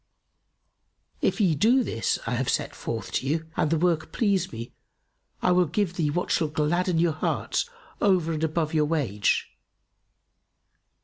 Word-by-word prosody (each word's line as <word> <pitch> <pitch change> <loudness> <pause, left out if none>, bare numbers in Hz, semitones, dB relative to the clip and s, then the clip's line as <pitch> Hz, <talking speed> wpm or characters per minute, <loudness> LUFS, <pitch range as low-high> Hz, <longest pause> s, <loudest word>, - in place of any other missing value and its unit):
If - - +1
ye 185 -6 +4
do 235 - +4
this 115 - -1
I 115 - -2
have 125 +1 0
set - - -1
forth - - -5
to 130 - -1
you 160 +3 0
and 155 - +1
the 165 - +2
work 165 -1 +1
please 200 -6 +1
me, 115 0 -7 0.7
I - - +4
will 180 -1 +4
give 180 +1 -1
you 150 -3 +1
what 175 +4 -2
shall 160 - +2
gladden 165 +4 0
your 165 -1 +3
hearts, 160 - -1 0.3
over 180 -5 +3
and 155 0 -2
above 160 0 0
your 155 -1 +3
wage." 130 -11 0
160 Hz, 160 wpm, -26 LUFS, 150-180 Hz, 0.7 s, ye